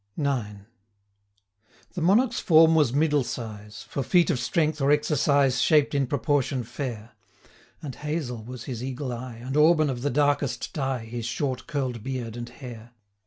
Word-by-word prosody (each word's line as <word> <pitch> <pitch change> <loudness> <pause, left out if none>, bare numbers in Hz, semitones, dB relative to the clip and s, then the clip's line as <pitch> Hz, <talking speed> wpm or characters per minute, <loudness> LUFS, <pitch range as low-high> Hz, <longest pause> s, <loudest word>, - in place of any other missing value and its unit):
IX. 120 -9 -2 1.3
The 180 - -4
Monarch's 225 +8 +3
form 165 -3 +6
was 150 -7 +3
middle 145 0 +2
size; 105 -3 -7
For 140 - -3
feat 175 +5 +3
of 135 - -1
strength, 155 +3 0
or 135 - +2
exercise, 140 -3 +2
Shaped 150 0 +3
in 140 -2 +1
proportion 135 0 0
fair; 120 -2 -6 0.7
230 - - -9
And 135 - -6
hazel 150 -7 -4
was 125 0 -8
his 125 -3 -5
eagle 130 0 -4
eye, 120 0 -7
And 125 +4 -6
auburn 155 -1 +4
of 120 -2 -5
the 145 - 0
darkest 145 -2 0
dye, 135 -5 -2
His 115 0 -5
short 130 +1 -3
curl'd 130 -5 -3
beard 125 -2 -5
and 120 0 -6
hair. 120 -2 -11
135 Hz, 165 wpm, -26 LUFS, 120-150 Hz, 1.3 s, form